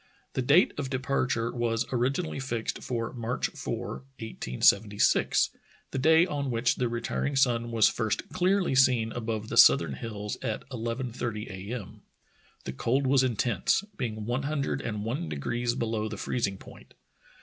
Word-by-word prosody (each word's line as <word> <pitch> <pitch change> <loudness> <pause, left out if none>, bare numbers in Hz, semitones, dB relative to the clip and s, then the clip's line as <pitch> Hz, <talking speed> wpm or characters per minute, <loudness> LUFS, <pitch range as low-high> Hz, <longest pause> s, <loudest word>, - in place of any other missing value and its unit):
The - - 0
date 145 +8 +4
of 135 -2 -3
de 130 - -1
parture 130 -3 -1
was 115 -1 0
originally 135 +7 -1
fixed 120 -4 -3
for 115 -2 -3
March 120 0 -2
4, - - -5 0.2
1876, 100 - +2 0.4
the 135 - -2
day 160 +4 +5
on 145 -6 -3
which 120 +1 +1
the 125 -2 0
retiring 120 +4 -2
sun 120 -3 +2
was 115 -2 +4
first 110 -2 -1
clearly 185 -2 +1
seen 125 -4 +4
above 110 -2 -4
the - - -3
southern 80 -5 +7
hills 105 - -5
at 115 -2 -3
11.30 115 -3 -4
a. 95 +4 -6
m. 105 -7 -9 0.6
The 65 - -5
cold 130 - 0
was 135 0 +4
intense, 120 - +1
being 110 - -4
one 120 +4 -1
hundred 140 -1 -2
and 105 -2 -4
one 115 - -3
degrees 120 +11 -2
below 110 -2 -2
the 105 - -6
freezing 100 -3 -1
point. - - -15
120 Hz, 155 wpm, -28 LUFS, 110-130 Hz, 0.6 s, southern